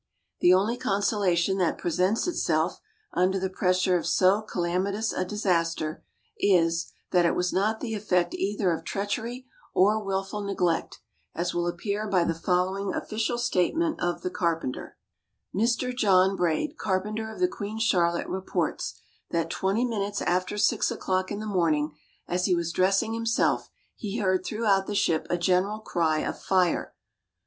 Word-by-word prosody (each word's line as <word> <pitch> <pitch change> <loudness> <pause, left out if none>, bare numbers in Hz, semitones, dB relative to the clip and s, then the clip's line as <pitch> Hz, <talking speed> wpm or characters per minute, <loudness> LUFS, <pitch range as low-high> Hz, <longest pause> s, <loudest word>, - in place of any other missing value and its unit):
The 175 - +5
only 200 +6 +3
consolation 195 -3 +1
that 175 -3 +1
presents 185 +6 +1
itself 355 - 0 0.3
under 185 +2 +2
the 190 0 -2
pressure 185 0 +2
of - - -5
so 190 +3 +4
calamitous 195 +2 -1
a 185 - -1
disaster 170 -5 -1 0.4
is, 170 -4 +2 0.2
that 180 -1 +4
it 170 - +2
was 180 0 0
not 215 +4 +1
the 225 -3 -3
effect 180 -4 0
either 195 -1 0
of 165 - -2
treachery 225 +5 -3 0.3
or 210 +3 +4
wilful 195 +1 -2
neglect, 185 -4 -1 0.4
as 175 +1 -1
will 175 0 0
appear 200 +5 -2
by 185 -4 +3
the 170 - 0
following 185 +3 0
official 220 +2 -2
statement 310 - +1
of 175 0 -1
the 180 - -2
carpenter: 165 -8 -2 0.6
"Mr. 235 +4 0
John 195 -4 +4
Braid, 175 - -1
carpenter 215 +3 -2
of - - -10
the 365 - +4
Queen 220 - -6
Charlotte, 175 -6 +2
reports, 190 0 -2 0.3
that 165 -1 -1
twenty 200 +6 0
minutes 205 -4 -2
after 185 +3 0
6 - - +2
o'clock 185 0 -1
in 205 - -3
the 215 - -5
morning, 160 -7 +1 0.3
as 180 +1 0
he 180 - +3
was 170 -1 -1
dressing 195 +5 +2
himself 230 0 +1 0.3
he 210 0 -4
heard 185 -4 +1
throughout 200 -2 +1
the 205 - -3
ship 165 -5 +1
a 175 - +1
general 185 +4 +1
cry 165 -7 0
of - - -4
'fire.' 185 -3 +1
190 Hz, 155 wpm, -27 LUFS, 175-210 Hz, 0.6 s, The